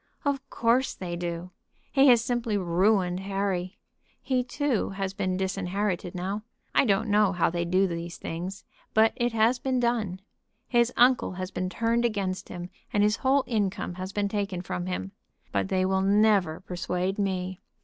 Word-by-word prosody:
"Of 275 -1 -1
course 240 +3 +2
they 175 -2 -5
do. 170 +1 -4 0.4
He 275 0 +5
has 240 -3 +6
simply 235 -4 0
ruined 185 0 +2
Harry. 195 -2 -2 0.4
He 255 -2 0
too 265 -2 -1
has 195 -1 -3
been 185 -1 -1
disinherited 190 -1 -2
now. 190 +4 -3 0.3
I - - +4
don't 205 0 +2
know 205 -2 +3
how 175 -2 +2
they 170 0 -1
do 185 +3 +3
these 170 -1 -4
things, 185 +3 -5 0.3
but 220 +1 +5
it 240 -1 0
has 230 +3 +3
been 260 -1 0
done. 225 -6 0 0.5
His 240 -1 +3
uncle 250 -4 +4
has 185 +1 -5
been 185 0 -2
turned 230 +5 +1
against 200 -5 -1
him, 175 +1 -7 0.2
and 205 - +3
his 210 +1 +3
whole 270 +1 +3
income 205 -6 -1
has 185 +2 -6
been 205 0 0
taken 200 -3 -2
from 90 - -4
him. 95 +1 -3 0.4
But 100 -1 0
they 185 0 +2
will 190 0 +1
never 200 -4 +3
persuade 180 +2 -2
me. 185 -2 -1
195 Hz, 170 wpm, -27 LUFS, 180-225 Hz, 0.5 s, has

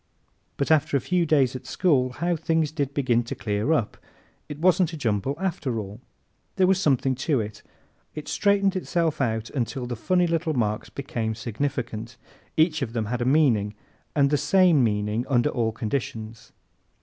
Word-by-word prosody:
But 140 - 0
after 145 -2 +3
a - - 0
few 175 +5 0
days 135 -4 +3
at 130 - -8
school 130 -9 +2
how 175 +5 0
things 160 -1 0
did 145 -4 -2
begin 130 -4 +1
to 120 - -6
clear 105 +5 -1
up! 135 -10 0 0.5
It 150 - -6
wasn't 175 0 +3
a - - -5
jumble 115 0 -1
after 155 -10 -2
all. 105 +2 -6 0.5
There 190 - +4
was 190 0 +3
something 135 -5 +2
to 135 +1 0
it. 105 -1 -5 0.5
It 150 - -7
straightened 200 -1 +2
itself 170 -5 -1
out 110 -2 -1
until 130 -1 -2
the 120 0 -4
funny 180 +10 +1
little 165 -2 0
marks 105 -3 -1
became 115 -5 -3
significant. 115 -1 -4 0.4
Each 160 -1 +3
of 120 -4 -3
them 115 -2 -1
had 125 - -2
a - - 0
meaning 120 -8 +3 0.4
and 140 -1 +3
the 145 - +3
same 160 0 +4
meaning 105 +1 0
under 120 -3 +2
all 115 -2 0
conditions. 110 -1 -5
135 Hz, 175 wpm, -25 LUFS, 115-160 Hz, 0.5 s, There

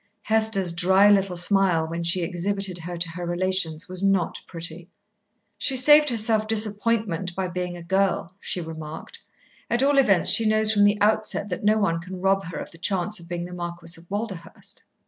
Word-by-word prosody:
Hester's 220 -5 +1
dry, 190 +3 +4
little 195 -3 +1
smile 180 -3 +1
when 170 +1 -5
she 170 +1 +1
exhibited 185 +1 -2
her 175 +1 -6
to 170 0 0
her 175 +2 -7
relations 175 -2 -1
was 185 0 -2
not 195 -3 0
pretty. 165 +1 -5 0.7
"She 265 - +1
saved 295 +3 +6
herself 220 -2 +1
disappointment 210 -4 0
by 190 -1 -2
being 180 0 -4
a 170 - -10
girl," 190 -1 0
she 180 - -4
remarked. 160 -1 -8 0.5
"At 240 +2 +1
all 280 0 +3
events, 195 -10 +4
she 225 - +5
knows 215 0 +4
from 205 -1 +4
the 205 0 +2
outset 215 -1 +1
that 180 - -5
no 215 +1 +3
one 170 -6 0
can 185 +1 -8
rob 195 +1 +1
her 165 - -7
of - - -7
the 165 - -16
chance 195 +3 0
of 170 0 -14
being 175 0 -4
the 180 - -9
Marquis 170 -1 -6
of 165 +1 -16
Walderhurst." 200 -4 -6
185 Hz, 185 wpm, -24 LUFS, 170-210 Hz, 0.7 s, saved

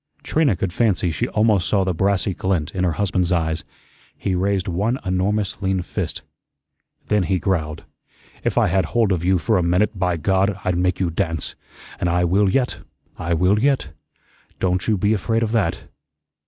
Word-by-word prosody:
Trina 150 -7 +2
could 90 -1 -3
fancy 100 -6 +1
she 80 - -1
almost 105 -4 +2
saw 100 -2 +2
the 95 -1 0
brassy 95 +2 +1
glint 90 -5 -1
in 95 - -1
her 90 -3 +1
husband's 90 0 0
eyes. 80 -2 0 0.5
He 95 - -2
raised 95 +1 0
one 100 +8 0
enormous 95 +3 -1
lean 95 -2 0
fist. - - -4 0.9
Then 105 -1 +3
he 95 +1 +1
growled: 80 -5 -2 0.6
"If - - -1
I - - +5
had 95 0 +1
hold 115 +3 +1
of 90 -3 0
you 95 +1 +3
for 110 +3 +1
a - - +2
minute, 90 +4 +1
by 90 -2 +1
God, 95 +4 +1
I'd 90 -1 +1
make 90 +1 0
you 90 -3 0
dance. 80 -2 -2 0.5
An' 90 - 0
I 90 +1 +2
will 95 +3 +3
yet, 125 +5 0 0.4
I 85 +1 0
will 90 +5 +3
yet. 135 - +1 0.7
Don't 90 -1 0
you 110 -2 +2
be 105 +3 +2
afraid 115 +3 0
of 110 - -1
that." 105 -8 0
95 Hz, 180 wpm, -21 LUFS, 90-105 Hz, 0.9 s, I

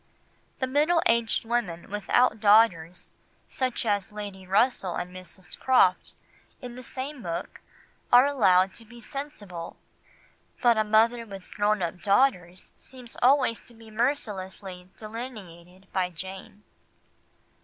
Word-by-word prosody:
The 260 - -1
middle 300 +6 +2
aged 230 0 +2
women 220 -8 -2
without 215 +2 +2
daughters, 205 -6 +3 0.4
such 255 -2 -2
as 205 0 0
Lady 200 -3 -8
Russell 195 -2 +1
and 180 +1 -5
Mrs. 185 -1 -10
Croft, 220 -8 +3 0.4
in 245 -2 -8
the 250 - -9
same 260 +2 -7
book, 170 -2 -5 0.5
are 245 +2 +8
allowed 190 -9 +3
to 230 - -13
be 240 +2 -14
sensible, 215 - -8 0.8
but 240 -2 +4
a 215 - +2
mother 225 +3 +3
with 195 -2 -11
grown 210 -1 +1
up 175 +1 -4
daughters 195 -5 +1
seems 250 -3 -12
always 255 -2 +4
to 240 - -15
be 225 -1 -15
mercilessly 195 -6 -3
delineated 195 -6 -9
by 185 -1 0
Jane. 190 +4 -9
215 Hz, 125 wpm, -26 LUFS, 185-245 Hz, 0.8 s, are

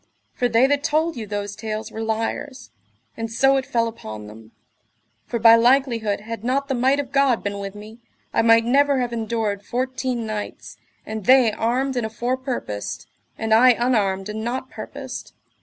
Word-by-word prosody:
For 245 - 0
they 230 +3 +4
that 285 +1 +1
told 320 +2 +1
you 225 -3 -6
those 205 0 -4
tales 215 0 -5
were 220 - -6
liars, 225 +5 -3 0.4
and 225 0 -5
so 270 +4 +4
it 265 - -2
fell 230 -1 +1
upon 110 - -8
them; 110 +1 -13 0.8
for 235 - -2
by 230 0 +8
likelihood 235 -4 +2
had 225 0 -7
not 270 +3 0
the 270 - -1
might 265 +3 +2
of 275 -2 -4
God 275 -4 +2
been 200 0 -3
with 195 0 -6
me, 215 +3 -11 0.3
I - - +3
might 230 0 +5
never 280 +2 +3
have 245 -1 -2
endured 220 -3 -2
fourteen 255 0 -2
knights, 215 -1 -6 0.3
and 220 -2 -6
they 255 -3 +6
armed 255 +5 -1
and 245 -3 -1
afore 240 +4 -2
purposed, 105 - -5 0.3
and 220 0 0
I 250 +3 +7
unarmed 210 -6 0
and 215 +1 -5
not 255 +3 -4
purposed. - - -8
230 Hz, 175 wpm, -22 LUFS, 215-260 Hz, 0.8 s, by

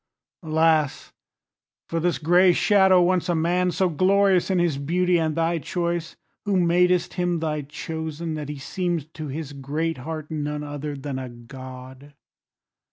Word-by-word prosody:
Alas! 160 -3 +1 0.7
for 165 - -2
this 175 +1 +1
gray 175 +3 +4
shadow, 190 -2 +5
once 180 0 +1
a 175 - +2
man 175 +3 +1
So 185 +1 +1
glorious 190 +3 +3
in 190 - +2
his 170 -5 +1
beauty 175 +4 +1
and 160 -2 0
thy 165 0 +1
choice, 170 +2 -3 0.3
Who 200 -3 +1
madest 180 +1 +2
him 175 -1 0
thy 155 -2 -2
chosen, 160 +2 -5
that 150 -2 -5
he 150 - -5
seem'd 165 +1 -3
To 155 -1 -6
his 145 +1 -5
great 150 +3 -3
heart 155 +3 -6
none 150 -1 -3
other 145 0 -5
than 135 -1 -5
a 130 -1 -6
God! 130 +3 -11
160 Hz, 155 wpm, -24 LUFS, 145-175 Hz, 0.7 s, shadow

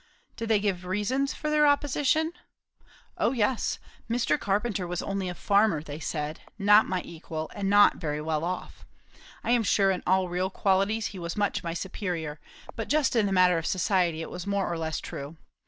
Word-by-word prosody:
"Did 225 0 -5
they 220 -2 +4
give 200 -3 0
any 180 - -11
reasons 250 +9 0
for 305 - -3
their 300 -1 +5
opposition?" 290 +3 +2 0.9
"O 235 - +2
yes. 235 0 0 0.3
Mr. 235 +1 +1
Carpenter 200 -2 -1
was 175 0 -3
only 195 -2 -2
a 180 - -5
farmer, 200 -6 +2
they 150 -1 -7
said; 150 -1 -3 0.2
not 210 +1 +6
my 185 -1 -2
equal, 160 -1 -6
and 195 -1 -2
not 205 0 +6
very 150 -3 -3
well 155 0 -1
off. 180 +2 -5 0.6
I - - 0
am 240 -1 +4
sure 195 -2 +3
in 185 - -2
all 185 0 +3
real 180 +2 -1
qualities 195 +3 +1
he 190 - -7
was 170 +1 -5
much 205 -1 0
my 170 -1 -3
superior; 170 -5 -4 0.4
but 225 - -5
just 295 -3 +2
in 220 -3 +3
the - - -2
matter 180 -2 +4
of 165 - -4
society 180 -4 +1
it - - -8
was 180 +1 -6
more 200 -3 0
or - - -3
less 160 -2 -2
true. 145 +4 -7
190 Hz, 195 wpm, -27 LUFS, 170-215 Hz, 0.9 s, not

